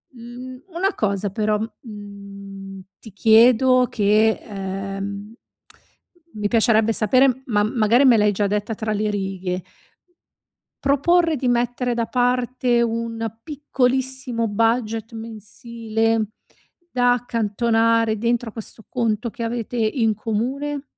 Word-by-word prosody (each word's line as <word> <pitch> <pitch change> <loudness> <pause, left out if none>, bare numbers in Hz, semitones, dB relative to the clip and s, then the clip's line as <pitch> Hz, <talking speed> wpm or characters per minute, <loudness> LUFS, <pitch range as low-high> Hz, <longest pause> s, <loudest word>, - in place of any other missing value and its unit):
Mhmm, 250 +2 -10
una 385 +3 +1
cosa 200 -1 -1
però, 210 0 0 0.2
mhmm, 200 -3 -10 0.2
ti 220 - -13
chiedo 245 +4 +5
che, 215 +1 +3
ehm, 195 +1 -6 1.0
mi 210 -1 -2
piacerebbe 225 -1 +3
sapere, 255 +5 +3
ma 205 -4 +2
magari 225 +3 +3
me 240 -3 +6
l'hai 210 0 +3
già 205 +1 0
detta 210 +2 -2
tra 215 0 -3
le 215 +1 -1
righe 190 -3 -3 1.2
proporre 325 +4 +3
di 260 -2 -2
mettere 245 0 0
da 235 -1 0
parte 250 0 +1
un 230 0 -3 0.2
piccolissimo 260 -4 -1
budget 225 +1 0
mensile, 225 0 -2 0.6
da 245 -1 +3
accantonare 230 -1 +1
dentro 235 0 0
questo 220 0 -7
conto 230 -1 -1
che - - -9
avete 235 +1 -3
in 225 0 +1
comune? 265 +7 -3
225 Hz, 110 wpm, -22 LUFS, 210-245 Hz, 1.2 s, me